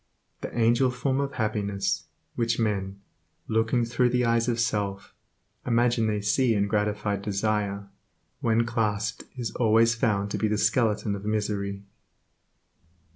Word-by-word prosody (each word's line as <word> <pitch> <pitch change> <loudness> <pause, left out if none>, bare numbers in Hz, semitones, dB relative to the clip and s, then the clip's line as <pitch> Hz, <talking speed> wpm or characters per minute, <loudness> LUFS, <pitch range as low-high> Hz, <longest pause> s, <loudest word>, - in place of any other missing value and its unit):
The - - -5
angel 120 +3 +3
form 130 +2 -1
of 140 0 -2
happiness, 105 -3 -1 0.3
which 115 -1 0
men, 100 -3 -1 0.5
looking 115 +2 +1
through 125 +2 +2
the 125 0 +1
eyes 115 0 +2
of 120 -1 0
self, 105 -4 -2 0.5
imagine 120 -1 +2
they 105 -1 -1
see 115 +3 +2
in 100 -1 +2
gratified 105 -1 -1
desire, 100 0 -1 0.5
when 115 0 +2
clasped 110 -2 -1
is 120 -2 -3
always 115 0 +3
found 105 -4 0
to - - -2
be 110 - +1
the 105 0 0
skeleton 105 0 +1
of 100 - -8
misery. 100 -2 -2
110 Hz, 135 wpm, -26 LUFS, 105-115 Hz, 0.5 s, angel